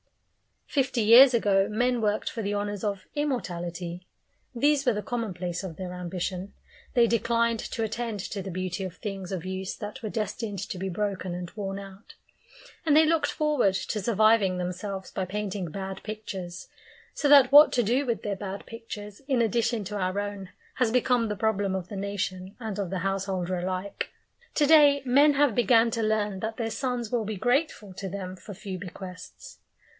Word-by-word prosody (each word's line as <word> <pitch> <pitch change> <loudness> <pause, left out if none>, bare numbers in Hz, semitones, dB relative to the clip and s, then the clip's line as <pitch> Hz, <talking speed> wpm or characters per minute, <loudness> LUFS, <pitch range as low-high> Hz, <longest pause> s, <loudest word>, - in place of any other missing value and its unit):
Fifty 265 -4 0
years 245 +5 +8
ago, 200 -4 +3
men 245 +2 +1
worked 210 0 0
for 230 - -5
the 205 0 -1
honours 205 -1 -3
of 200 -3 -2
immortality; 180 - -3 0.5
these 285 +3 +3
were 245 - +4
the 210 0 -3
commonplace 185 -7 -3
of 180 -4 -6
their 180 0 -6
ambition; 180 +2 -4 0.4
they 240 -1 +6
declined 230 0 +1
to 225 - -3
attend 220 -1 -3
to 200 +2 -5
the 190 - -6
beauty 185 +1 -3
of 180 -1 -7
things 195 -2 -6
of 185 -2 -4
use 190 0 -4
that 210 +5 -7
were 220 - -3
destined 215 -1 -3
to 190 -1 -5
be 190 - -2
broken 190 -1 -2
and 175 -1 -6
worn 195 -2 -4
out, 195 +1 -11 0.7
and 300 -2 +4
they 315 +1 +7
looked 325 0 +2
forward 295 -11 +2
to 210 +2 -2
surviving 215 -3 +3
themselves 185 +2 -4
by 190 - -2
painting 195 -2 -3
bad 190 +3 -6
pictures; 190 -5 -6 0.4
so 290 - 0
that 280 -3 +7
what 295 +2 +9
to 245 - +3
do 250 +7 +1
with 235 -3 -2
their 205 -1 -1
bad 195 0 -6
pictures 210 -2 -8
in 265 -4 +2
addition 230 0 +1
to 205 +2 -5
our 185 +1 -1
own 205 -2 -5 0.3
has 250 -3 +2
become 245 0 +2
the 210 - -2
problem 205 -2 0
of 185 -1 -4
the 205 - -6
nation 195 -1 -3
and 215 -3 -4
of 195 -3 -2
the 190 0 -2
householder 190 -1 -1
alike. 185 +2 -3 0.5
To 295 - +4
day 290 -2 +6
men 285 +4 +5
have 285 -3 +3
began 230 +1 +4
to 230 - -1
learn 210 -3 0
that 220 +2 -4
their 225 -2 -2
sons 245 -1 -2
will 235 -3 0
be 215 +1 -3
grateful 245 - 0
to 195 0 -5
them 185 -1 -5
for 205 +2 -10
few 190 -1 -6
bequests. 180 0 -10
205 Hz, 185 wpm, -27 LUFS, 190-235 Hz, 0.7 s, what